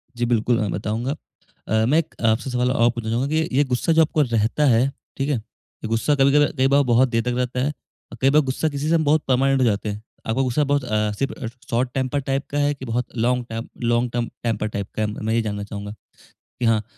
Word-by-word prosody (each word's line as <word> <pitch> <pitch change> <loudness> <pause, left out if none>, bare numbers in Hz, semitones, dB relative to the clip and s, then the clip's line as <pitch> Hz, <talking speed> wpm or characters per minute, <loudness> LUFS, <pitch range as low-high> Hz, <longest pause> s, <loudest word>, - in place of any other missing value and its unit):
जी। 120 - 0
बिल्कुल, 120 0 +2
मैं 105 -3 -1
बताऊँगा। 110 +6 -2 0.6
अ, 110 +1 +2
मैं 145 +6 +3
एक 160 - -5
आपसे 115 +4 +1
सवाल 125 0 +1
और 120 -2 +3
पूछना 115 -2 -5
चाहूँगा 120 +4 0
कि 160 0 +1
ये 145 - +5
गुस्सा 130 +5 0
जो 160 - +5
आपको 155 -1 +2
रहता 120 +3 +1
है, 125 0 +4 0.3
ठीक 135 +2 -1
है? 145 - +2
ये 110 0 -12
गुस्सा 115 +6 +1
कभी-कभी 140 +2 +4
कई 130 +1 +4
बार 140 +1 +4
बहुत 125 +1 +3
देर 115 -1 +1
तक 125 - -1
रहता 125 0 -1
है 140 +4 +1 0.4
और 115 - -9
कई 135 - +5
बार 150 +2 +5
गुस्सा 135 +3 -1
किसी 145 +2 -3
से 170 - +4
हम 160 - +2
बहुत 150 +1 +3
पर्मानेंट 135 +1 +3
हो - - +4
जाते 105 -1 0
हैं। 105 +1 -5 0.3
आपका 120 +4 +1
गुस्सा 135 +3 +1
बहुत 145 -2 +2
अ, 105 -3 0
सिर्फ़ 135 -3 -3 0.2
शॉर्ट 125 +1 +1
टेम्पर्ड 135 +1 -1
टाइप 135 +1 -1
का 145 - -3
है 145 0 +2
कि 135 -2 -9
बहुत 120 +1 -2
long 125 +1 +1
time 115 +1 -5 0.2
long 120 +1 +1
term 120 -1 -2
temper 110 -2 -1
type 100 -1 -4
का 110 - -2
है? 105 - +1
मैं 110 +1 -3
ये 115 - +2
जानना 105 -2 -3
चाहूँगा 105 0 -7 0.5
कि 120 - -6
हाँ, 110 -2 +3
125 Hz, 245 wpm, -22 LUFS, 115-135 Hz, 0.6 s, ये